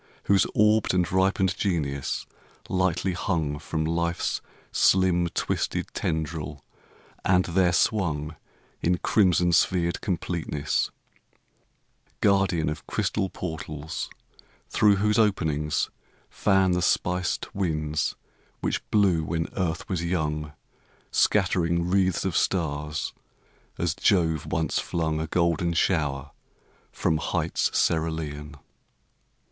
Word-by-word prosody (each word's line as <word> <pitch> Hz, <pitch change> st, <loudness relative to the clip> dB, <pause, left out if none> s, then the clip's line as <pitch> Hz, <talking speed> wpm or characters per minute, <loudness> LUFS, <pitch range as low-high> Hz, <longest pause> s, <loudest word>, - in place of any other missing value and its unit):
Whose 100 Hz, -1 st, +3 dB
orbed 105 Hz, -2 st, +3 dB
and 90 Hz, -1 st, +1 dB
ripened 95 Hz, 0 st, +2 dB
genius 75 Hz, -10 st, -1 dB, 0.4 s
lightly 95 Hz, 0 st, 0 dB
hung 80 Hz, -5 st, -1 dB
From 80 Hz, +1 st, -2 dB
life's 85 Hz, +1 st, -1 dB, 0.3 s
slim, 90 Hz, -2 st, +3 dB
twisted -, -, -2 dB
tendril 80 Hz, -2 st, -3 dB, 0.6 s
and 90 Hz, 0 st, +3 dB
there 90 Hz, 0 st, +2 dB
swung 80 Hz, -6 st, 0 dB, 0.5 s
In 90 Hz, +1 st, +2 dB
crimson 90 Hz, -3 st, +3 dB
sphered 85 Hz, 0 st, +2 dB
completeness; 85 Hz, -5 st, -1 dB, 1.3 s
guardian 95 Hz, -5 st, +2 dB
Of 75 Hz, -, -4 dB
crystal 95 Hz, -3 st, -1 dB
portals 80 Hz, -3 st, -5 dB, 0.6 s
through 105 Hz, -1 st, +5 dB
whose 105 Hz, +3 st, +2 dB
openings 80 Hz, -8 st, +1 dB, 0.4 s
fan 95 Hz, -2 st, +3 dB
The 90 Hz, 0 st, +1 dB
spiced 90 Hz, +1 st, 0 dB
winds 75 Hz, -5 st, -1 dB, 0.4 s
which -, -, -1 dB
blew 95 Hz, -6 st, +3 dB
when 80 Hz, +1 st, -2 dB
earth 85 Hz, -4 st, -2 dB
was 90 Hz, -3 st, -2 dB
young, 75 Hz, -4 st, -2 dB, 0.6 s
Scattering 85 Hz, -4 st, +2 dB
wreaths 95 Hz, -1 st, +2 dB
of 95 Hz, -, -1 dB
stars, 75 Hz, -3 st, -1 dB, 0.6 s
as 85 Hz, -2 st, 0 dB
Jove 80 Hz, -5 st, +2 dB
once 80 Hz, 0 st, 0 dB
flung 80 Hz, -2 st, -1 dB
A 80 Hz, -, -3 dB
golden 85 Hz, 0 st, +1 dB
shower 75 Hz, -6 st, 0 dB, 0.6 s
from 80 Hz, -, 0 dB
heights 75 Hz, -, 0 dB
cerulean. 80 Hz, -2 st, -1 dB
85 Hz, 100 wpm, -26 LUFS, 80-95 Hz, 1.3 s, through